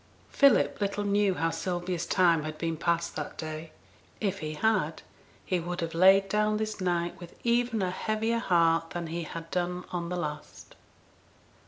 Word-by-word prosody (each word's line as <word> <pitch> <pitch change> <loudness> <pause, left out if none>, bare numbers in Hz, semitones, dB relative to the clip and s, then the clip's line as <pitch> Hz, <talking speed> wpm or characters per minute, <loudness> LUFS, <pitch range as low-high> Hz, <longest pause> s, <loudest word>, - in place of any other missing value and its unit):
Philip 280 -6 +4
little 200 +1 -1
knew 200 -1 +2
how 165 -1 0
Sylvia's 175 -1 -3
time 170 -4 +4
had 155 0 -5
been 165 -1 -2
passed 170 +1 -1
that 150 - -5
day. 155 0 -6 0.5
If 195 -2 -1
he 155 0 -4
had, 185 -5 0 0.4
he 185 - 0
would 175 +1 -4
have 165 -1 -3
laid 190 +3 +6
down 210 +1 +1
this 215 -1 -3
night 175 -1 -1
with 175 -2 -11
even 235 -2 +1
a 180 - 0
heavier 220 +4 -1
heart 165 -5 +2
than 175 -1 -4
he 165 +1 -4
had 165 +1 -8
done 180 0 -1
on 170 -1 -3
the 180 - -2
last. 150 -3 -6
180 Hz, 170 wpm, -28 LUFS, 165-200 Hz, 0.5 s, laid